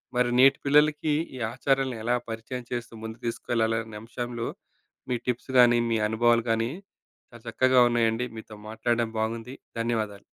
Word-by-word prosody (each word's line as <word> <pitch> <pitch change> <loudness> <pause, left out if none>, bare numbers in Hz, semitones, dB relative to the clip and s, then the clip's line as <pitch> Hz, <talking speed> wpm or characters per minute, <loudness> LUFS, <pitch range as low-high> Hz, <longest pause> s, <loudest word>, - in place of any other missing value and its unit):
మరి 125 0 +2
నేటి 135 +1 +7
పిల్లలకి 150 +1 +3 0.2
ఈ - - -7 0.2
ఆచారాలను 135 -1 0
ఎలా 120 +2 +2
పరిచయం 115 +2 -6
చేస్తూ 120 -1 -4
ముందుకు 110 +1 -8
తీసుకెళ్లాలి? 115 -1 0
అనే 110 -1 -9
అంశంలో, 120 +1 -5 0.6
మీ 125 - +1
టిప్స్ 125 +2 -2
గానీ, 120 -1 +6
మీ 115 - +2
అనుభవాలు 115 +1 +3
గానీ, 115 +2 0 0.6
చాలా 120 -1 -14
చక్కగా 130 +2 +4
ఉన్నాయండి. 120 0 +1
మీతో 110 -1 -10
మాట్లాడం 115 +1 0
బాగుంది. 115 +3 -3 0.3
ధన్యవాదాలు. 110 -4 -2
120 Hz, 145 wpm, -26 LUFS, 115-125 Hz, 0.6 s, నేటి